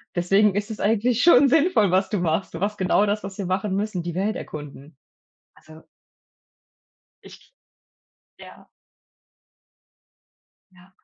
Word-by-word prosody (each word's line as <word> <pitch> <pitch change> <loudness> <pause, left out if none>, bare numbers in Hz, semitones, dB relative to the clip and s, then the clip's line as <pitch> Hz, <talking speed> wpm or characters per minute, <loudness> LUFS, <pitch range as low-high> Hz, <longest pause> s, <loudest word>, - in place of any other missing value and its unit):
Deswegen 195 +3 +2
ist 205 +2 -3
es 215 - -8
eigentlich 225 +3 0
schon 280 -5 +6
sinnvoll, 280 - +2
was 190 +1 +1
du 205 -4 -2
machst. 170 +2 -2
Du 165 - -6
machst 205 +2 -3
genau 190 +2 +1
das, 210 0 -2
was 195 0 -8
wir 195 - -4
machen 190 +1 -2
müssen, 200 -4 -3
die 170 -1 -6
Welt 205 +3 -1
erkunden. 145 -1 -10 0.6
Also 155 +1 -17 1.4
Ich - - -17 0.8
ja. - - -15 2.0
Ja. 185 +1 -21
200 Hz, 130 wpm, -23 LUFS, 180-215 Hz, 2.0 s, schon